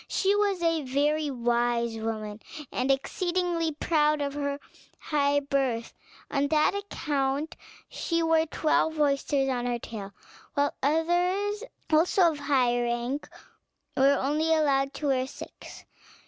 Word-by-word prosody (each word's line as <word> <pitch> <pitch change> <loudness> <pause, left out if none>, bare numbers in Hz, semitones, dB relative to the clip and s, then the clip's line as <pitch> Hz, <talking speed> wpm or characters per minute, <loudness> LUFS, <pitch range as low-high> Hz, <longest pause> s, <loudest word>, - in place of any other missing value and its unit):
She 395 +1 +2
was 400 -4 +1
a 330 -1 +2
very 295 +3 0
wise 235 -2 0
woman, 220 -1 -4 0.3
and 255 +2 -1
exceedingly 345 +4 0
proud 300 0 +2
of 280 -1 -2
her 285 -1 -2 0.4
high 285 -1 +1
birth; 270 -5 -1 0.4
on 280 0 +1
that 305 +3 +3
account 295 -7 -2 0.3
she 335 -1 -1
wore 325 0 +3
twelve 315 0 +1
oysters 280 -1 +1
on 245 -2 -1
her 240 -1 0
tail; 210 -4 -7 0.4
while 285 0 +1
others, 355 - +1 0.3
also 340 +2 +4
of 300 - -7
high 250 -4 +2
rank, 240 +4 -2 0.7
were 275 +1 +4
only 305 +4 0
allowed 275 -3 +1
to 300 - -5
wear 260 -1 +1
six. - - -11
285 Hz, 130 wpm, -27 LUFS, 260-320 Hz, 0.7 s, also